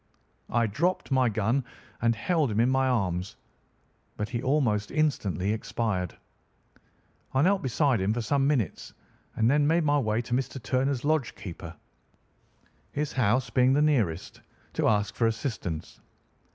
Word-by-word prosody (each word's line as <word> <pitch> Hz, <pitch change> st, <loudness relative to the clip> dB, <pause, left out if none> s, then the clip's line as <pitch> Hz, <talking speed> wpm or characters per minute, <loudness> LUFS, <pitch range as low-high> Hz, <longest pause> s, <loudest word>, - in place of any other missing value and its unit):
I 120 Hz, 0 st, +2 dB
dropped 165 Hz, -, -1 dB
my 130 Hz, -2 st, +3 dB
gun 110 Hz, +5 st, 0 dB, 0.4 s
and 115 Hz, 0 st, +3 dB
held 155 Hz, -, +1 dB
him 105 Hz, 0 st, -1 dB
in 120 Hz, +3 st, +4 dB
my 130 Hz, 0 st, +2 dB
arms, 95 Hz, -7 st, -1 dB, 0.8 s
but 105 Hz, -, -3 dB
he 120 Hz, -2 st, -3 dB
almost 120 Hz, -8 st, +1 dB
instantly 105 Hz, -, 0 dB
expired. 105 Hz, -5 st, -2 dB, 1.2 s
I 135 Hz, -, +4 dB
knelt 195 Hz, +2 st, +3 dB
beside 130 Hz, -, +1 dB
him 95 Hz, +2 st, +1 dB
for 120 Hz, +2 st, -1 dB
some 135 Hz, +3 st, +1 dB
minutes, 135 Hz, -9 st, -1 dB, 0.4 s
and 110 Hz, -, +2 dB
then 145 Hz, +3 st, +3 dB
made 165 Hz, +2 st, +3 dB
my 145 Hz, -1 st, +3 dB
way 110 Hz, -2 st, 0 dB
to 120 Hz, -, -5 dB
Mr. 135 Hz, +1 st, -1 dB
Turner's 130 Hz, +1 st, -1 dB
lodge 155 Hz, -4 st, +1 dB
keeper, 85 Hz, -3 st, -8 dB, 1.2 s
his 150 Hz, 0 st, -2 dB
house 125 Hz, 0 st, +1 dB
being 125 Hz, +1 st, +4 dB
the 145 Hz, -, +3 dB
nearest, 110 Hz, -, 0 dB, 0.3 s
to -, -, +1 dB
ask 105 Hz, -1 st, +1 dB
for 115 Hz, +1 st, +2 dB
assistance. 110 Hz, -, -4 dB
120 Hz, 150 wpm, -27 LUFS, 105-140 Hz, 1.2 s, in